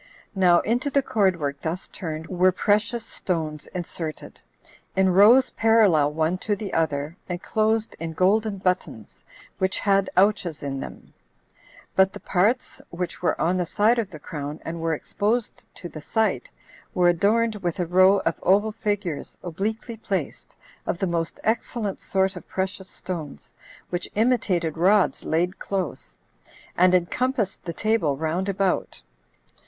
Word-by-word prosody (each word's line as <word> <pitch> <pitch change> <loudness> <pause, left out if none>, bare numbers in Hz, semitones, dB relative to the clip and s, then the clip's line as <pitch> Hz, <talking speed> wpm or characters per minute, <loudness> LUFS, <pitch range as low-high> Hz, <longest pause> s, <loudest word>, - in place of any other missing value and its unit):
Now 180 -3 +4
into 245 +5 0
the 280 0 +2
cordwork 175 - 0
thus 170 +3 -4
turned 160 -2 -6
were 185 +1 +3
precious 215 +5 +1
stones 155 -4 -4
inserted, 165 -3 -6 0.5
in 190 -1 +3
rows 225 +8 +6
parallel 205 -10 +4
one 160 +4 0
to 210 +1 -1
the 200 -1 -6
other, 150 -1 -1
enclosed 215 +5 0
in 165 0 -4
golden 200 +4 +2
buttons, 180 - -3 0.4
which 190 0 +1
had 195 -1 +2
ouches 190 -6 +2
in 135 -1 -3
them; - - -9 0.8
but 190 0 +4
the - - -8
parts 205 +7 0
which 175 +1 -5
were 175 - 0
on 180 +3 +1
the 180 - 0
side 220 +6 +3
of 215 -4 -2
the 165 - -9
crown, 150 -1 -6
and 165 0 -5
were 165 -1 0
exposed 215 +9 -2
to 175 - -7
the 155 -2 -9
sight, 220 - 0 0.5
were 180 -1 +4
adorned 215 +5 +2
with 175 -4 -3
a 180 - +1
row 185 +3 +5
of 165 - -1
oval 205 +4 +3
figures 205 -8 -3
obliquely 220 +7 -4
placed, 195 -7 -4 0.3
of - - -1
the 195 - -1
most 170 -2 -2
excellent 220 -2 -1
sort 190 0 0
of 180 - -10
precious 190 0 -3
stones, 165 -6 -7 0.4
which 175 0 -3
imitated 190 -9 +1
rods 195 +3 +3
laid 175 +4 0
close, 190 -5 -4 0.6
and 180 +1 +5
encompassed 215 +4 0
the 170 - -3
table 215 -9 +1
round 165 +6 -1
about. 195 -1 -1
185 Hz, 145 wpm, -24 LUFS, 165-210 Hz, 0.8 s, rows